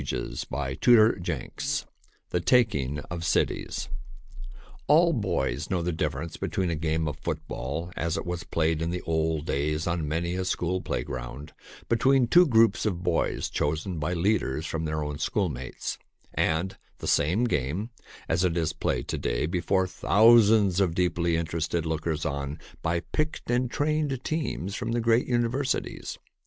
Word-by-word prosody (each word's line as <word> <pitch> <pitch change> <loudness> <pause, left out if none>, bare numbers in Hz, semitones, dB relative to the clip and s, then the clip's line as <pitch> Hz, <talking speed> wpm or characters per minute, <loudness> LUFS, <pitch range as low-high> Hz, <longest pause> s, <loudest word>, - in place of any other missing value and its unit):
ea, - - -3 0.2
by 65 0 -2
Archidamus 110 -6 +2
[i] - - -29 0.4
THE 90 - +1
TAKING 85 - +2
OF 85 -1 -4
CITIES 85 - 0 1.0
ALL 170 +3 +5
boys 100 - -1
know 90 -3 0
the 90 - 0
difference 85 0 -3
between 95 -3 -1
a - - 0
game 80 +1 -1
/% - - 0
of 70 -1 -7
football 80 +9 -4
as 85 0 -1
it - - -4
was 90 -1 -3
played 80 -1 0
in 80 - -1
the 90 +1 -3
old 80 -1 0
days 75 +2 0
JL - - -3
JLi 85 - 0
on 85 -3 -2
many 85 +3 -1
a 95 +1 -1
school 90 0 -1
playground 65 +5 -5 0.3
between 130 +2 +4
two 175 +9 +6
groups 115 -4 +4
of 90 -4 -2
boys 85 -2 0
chosen 80 +4 -2
by 75 +4 -1
leaders 85 -5 0
from 80 0 -3
their 75 0 -1
own 75 -1 -4
schoolmates, 75 - -2 0.3
and 85 +4 0 0.2
the - - -8
same 90 +11 +2
game 90 - -1 0.4
as 85 +3 +1
it 90 -2 +1
is 80 -3 0
played - - -2
to - - -2
day - - 0
before 90 +3 +1
thousands 105 0 +5
of 90 -4 +2
deeply 85 -2 +1
interested 85 0 -1
lookers 80 -1 -2
on 70 +1 -3 0.2
by 85 +1 0
picked 155 - -2
and 125 0 +1
trained 145 -2 0
teams 150 - -2
from 115 - -3
the 120 - +1
great 115 +1 +3
universities. 120 +2 -1
85 Hz, 165 wpm, -27 LUFS, 80-110 Hz, 1.0 s, two